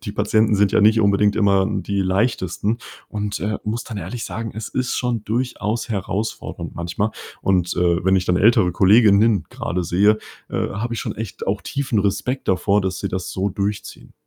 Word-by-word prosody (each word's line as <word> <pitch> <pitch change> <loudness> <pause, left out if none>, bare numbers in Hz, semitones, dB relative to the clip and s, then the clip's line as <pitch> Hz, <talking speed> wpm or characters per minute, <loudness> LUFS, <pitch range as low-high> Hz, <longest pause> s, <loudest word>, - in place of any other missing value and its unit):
die 100 - -5
Patienten 110 +1 +2
sind 100 -1 +3
ja - - +4
nicht 110 +2 +5
unbedingt 100 0 +3
immer 100 -3 +3
die 100 0 -2
leichtesten 100 +2 0 0.3
und, 105 -1 -3
äh, 105 0 -2
muss 110 +3 -3
dann 110 - -7
ehrlich 120 +3 -5
sagen, 110 +4 -5
es 110 0 -5
ist 130 -1 -2
schon 120 -4 -1
durchaus 115 -1 -2
herausfordernd 105 +1 -4
manchmal. 85 +5 -2 0.3
Und, 90 -2 +1
äh, 85 0 +1
wenn 95 0 +4
ich 90 - 0
dann 90 - +1
ältere 105 -3 +4
Kolleginnen 105 0 +5
grade 90 0 -3
sehe, 105 +5 +3 0.3
äh, - - -1
habe 115 +4 -3
ich - - -3
schon - - -4
echt 110 -3 -6
auch 100 +1 -1
tiefen 130 -6 -1
Respekt 105 +7 -1
davor, 100 +2 +2
dass 95 -1 -2
sie - - -2
das 95 -1 -4
so 95 +2 -1
durchziehen. 100 +2 -4
105 Hz, 185 wpm, -21 LUFS, 95-110 Hz, 0.3 s, nicht